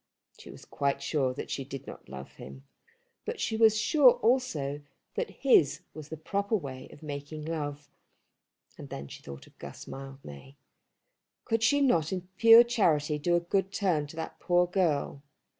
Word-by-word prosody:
She - - -12
was - - -12
quite 140 -1 -1
sure 140 -2 0
that - - -6
she 135 - -2
did 135 0 -8
not - - -11
love 65 0 -9
him, 65 0 -11 0.6
but - - -5
she 220 - -1
was 220 -1 +5
sure 255 +3 +6
also 155 - 0 0.3
that 485 - -2
his 245 - +3
was 155 -1 -10
the 160 - -6
proper 200 +7 -1
way 135 -9 -6
of 150 - -15
making 150 +1 -6
love. 145 -3 -4 0.9
And - - -9
then 70 - -7
she - - -11
thought 70 0 -10
of - - -23
Guss - - -9
Mildmay. 135 - -10 0.9
Could 225 -2 0
she 285 +5 +3
not 170 - +2
in 180 -1 -4
pure 230 +1 +9
charity 155 -11 +1
do 175 +3 +1
a - - +4
good 190 +2 -1
turn 175 -8 0
to 150 - -12
that 160 - -6
poor 175 0 +3
girl? 165 -6 0
155 Hz, 175 wpm, -29 LUFS, 140-200 Hz, 0.9 s, pure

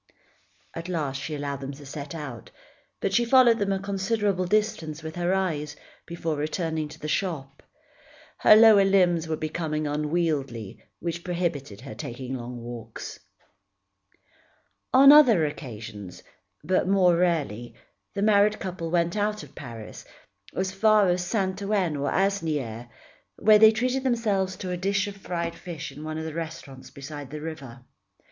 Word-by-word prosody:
At 165 +2 -6
last 145 -6 -2
she 155 +1 -4
allowed 140 -1 -4
them 135 +1 -5
to 145 +1 -12
set 140 +2 -7
out, 130 - -7 0.5
but 195 - -1
she 235 - +4
followed 235 -1 +5
them 200 -1 0
a 195 - +1
considerable 200 -1 -1
distance 180 -6 -1
with 160 0 -6
her 175 0 0
eyes, 155 -6 -1 0.3
before 165 -2 -3
returning 155 +1 -2
to 150 - -12
the 150 - -5
shop. 150 -6 -3 0.8
Her - - +8
lower 215 -2 +8
limbs 180 -4 +3
were 160 - -1
becoming 155 0 -3
unwieldy 150 - -2 0.2
which 170 0 -4
prohibited 165 - -3
her 130 -4 -8
taking 125 +3 -6
long 125 -1 -6
walks. 120 -1 -8 1.7
On 275 +2 +8
other 245 - +7
occasions, 110 - -8 0.4
but 185 +3 +1
more 185 -3 +4
rarely, 150 - -1 0.4
the 200 - -1
married 210 0 +4
couple 180 -3 -5
went 170 +1 +1
out 210 -2 -1
of 145 -1 -14
Paris, 115 -6 -9 0.5
as 190 0 -1
far 210 0 +4
as 175 0 +1
Saint 190 0 -1
Ouen 195 -6 0
or 140 0 -1
Asnières, 150 - -1 0.5
where 215 -1 +5
they 220 0 +8
treated 255 +4 -1
themselves 210 -7 0
to 185 - -5
a 180 - -2
dish 200 +3 0
of 205 -1 -6
fried 170 -3 -3
fish 165 -3 -7
in 150 - -10
one 155 0 -4
of 160 - -4
the 160 - -5
restaurants 160 -5 -7
beside 140 0 -8
the 150 +1 -6
river. 140 -6 -8
170 Hz, 155 wpm, -26 LUFS, 145-195 Hz, 1.7 s, Her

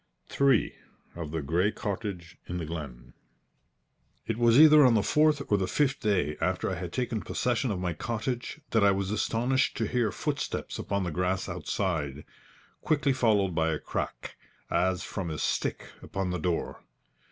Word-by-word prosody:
III 135 -5 +3 0.4
OF 85 -3 -5
THE 80 -1 -3
GREY 85 +8 +1
COTTAGE 100 -5 -5
IN 90 - -4
THE 85 - -3
GLEN 65 -7 -7 1.1
It 115 - -1
was 120 +2 +5
either 155 -1 +9
on 125 -3 +5
the 105 - +3
fourth 150 -1 +3
or 105 - +4
the 95 - 0
fifth 140 +4 +1
day 90 -8 0
after 90 +3 0
I - - -1
had 90 -2 -5
taken 120 +1 -2
possession 125 +1 -1
of 100 - -1
my 90 -1 -2
cottage 120 - -4
that 110 -2 +3
I 100 - +6
was 95 0 0
astonished 120 +5 +1
to 115 - 0
hear 115 -1 0
footsteps - - -3
upon 100 -1 -1
the 90 - -2
grass 90 +3 -1
outside, 75 -7 -2 0.6
quickly 145 -3 +2
followed 105 -7 +2
by 80 0 +1
a 80 - 0
crack, - - -5 0.3
as 95 0 +1
from 95 -4 -4
a 80 - -4
stick - - -2
upon 95 -2 -3
the 90 - -2
door. 85 +1 -2
100 Hz, 170 wpm, -28 LUFS, 85-120 Hz, 1.1 s, either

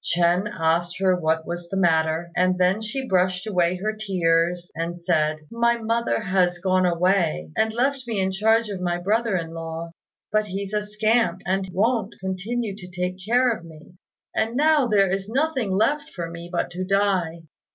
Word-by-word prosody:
Ch'ên 175 +4 +1
asked 170 +2 +1
her 190 -1 +3
what 160 -2 0
was 175 0 -6
the 195 - -3
matter, 165 -1 +1
and 180 +1 +2
then 185 +3 +2
she 255 +5 -4
brushed 185 0 +1
away 180 -4 +1
her 210 +4 -2
tears, 175 -4 0
and 170 +2 -4
said, 155 -3 +1
"My 235 0 +2
mother 230 - 0
has 180 -2 +1
gone 185 +1 +2
away 170 - +1
and 220 - +2
left 260 +2 -1
me 220 -4 -1
in 190 0 +1
charge 220 +3 +2
of 195 -3 -5
my 175 -1 0
brother 215 +4 0
in 165 -2 -3
law; 165 0 -6 0.4
but 215 0 +1
he's 195 +1 -5
a 210 - +1
scamp, 210 -2 +1
and 190 +1 -1
won't 225 +5 0
continue 200 +3 -3
to 180 -3 -10
take 180 +1 -4
care 245 +4 +3
of 175 - -12
me; 160 +1 -14 0.4
and 225 +2 0
now 300 -1 +4
there 200 -4 +3
is 195 +1 -2
nothing 265 -3 0
left 230 +10 +1
for 170 -2 -5
me 170 +1 -8
but 175 0 -1
to 180 +1 -4
die." 185 -4 0
185 Hz, 185 wpm, -24 LUFS, 175-215 Hz, 0.4 s, now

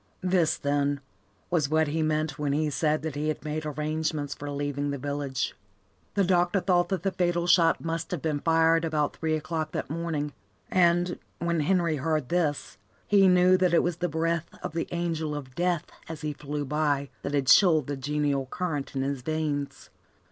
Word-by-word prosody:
This, 180 -3 +2
then, 145 0 0 0.5
was 155 -6 +2
what 155 -1 +2
he 160 +2 -1
meant 155 -1 0
when 145 -1 0
he 150 +1 0
said 155 +1 0
that 160 -2 -3
he 145 +2 -2
had 155 0 -3
made 155 0 -3
arrangements 150 -1 -2
for 145 +1 -7
leaving 145 0 -2
the 140 - -2
village. 140 -1 -2 0.6
The 200 - +3
doctor 180 +1 +2
thought 175 -2 +2
that 190 -3 -2
the 195 - +1
fatal 175 -2 0
shot 170 -2 +4
must 165 0 -2
have 180 - -2
been 155 -2 0
fired 165 +1 +3
about 155 -2 0
three 160 -1 0
o'clock 155 0 -3
that - - -3
morning, 155 -3 -2 0.4
and, 175 0 +3 0.2
when 170 -1 0
Henry 170 0 +2
heard 155 -2 -1
this, 160 -5 -1 0.3
he 200 -2 +5
knew 180 0 +5
that 180 -2 +3
it - - +4
was 175 -2 -1
the 175 0 -1
breath 165 +1 -1
of 180 - -4
the 165 - -2
angel 165 -3 -2
of 135 -3 -7
death 175 +1 0 0.2
as 160 -3 -6
he 150 -1 -2
flew 145 0 -4
by 145 -1 0
that 145 - -2
had 140 -2 +1
chilled 155 0 +6
the 145 - -3
genial 140 0 -1
current 150 -3 -3
in 135 - 0
his 140 -1 -2
veins. 150 0 -3
155 Hz, 190 wpm, -27 LUFS, 145-170 Hz, 0.6 s, chilled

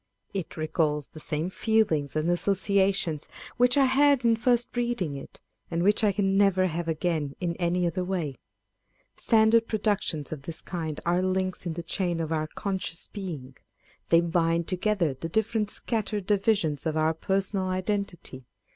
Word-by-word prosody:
It 190 -4 -5
recalls 155 -2 0
the 155 - -11
same 155 +4 -2
feelings 190 -12 +1
and 155 +1 0
associations 190 -3 +1 0.3
which 245 +2 +4
I 275 - +6
had 275 -1 +4
in 230 -1 +5
first 240 +1 +1
reading 235 -11 -1
it, 135 - -10 0.3
and 170 0 -1
which 205 +3 +3
I 210 - +5
can 195 -1 +1
never 195 -2 +4
have 170 -1 -2
again 160 -3 -1
in 170 -2 -2
any 175 0 +1
other 175 +2 -1
way. 170 -8 -3 0.8
Standard 225 0 +4
produc 210 -2 +1
tions 150 -3 -3
of 155 -3 -5
this 160 +3 -5
kind 160 -4 -4
are 175 +1 +2
links 185 -1 -1
in 165 - -2
the 170 +1 -5
chain 175 0 -1
of 160 -1 -3
our 155 -1 0
conscious 190 -1 -4
being. 155 -11 -7 0.5
They 165 0 +5
bind 170 -1 +1
together 185 -4 0
the 165 +5 -6
different 220 +2 0
scattered 210 -3 -2
divisions 195 -8 +1
of 160 0 -1
our 155 +1 +2
personal 190 +3 -1
identity. 185 - -3
180 Hz, 165 wpm, -27 LUFS, 160-205 Hz, 0.8 s, I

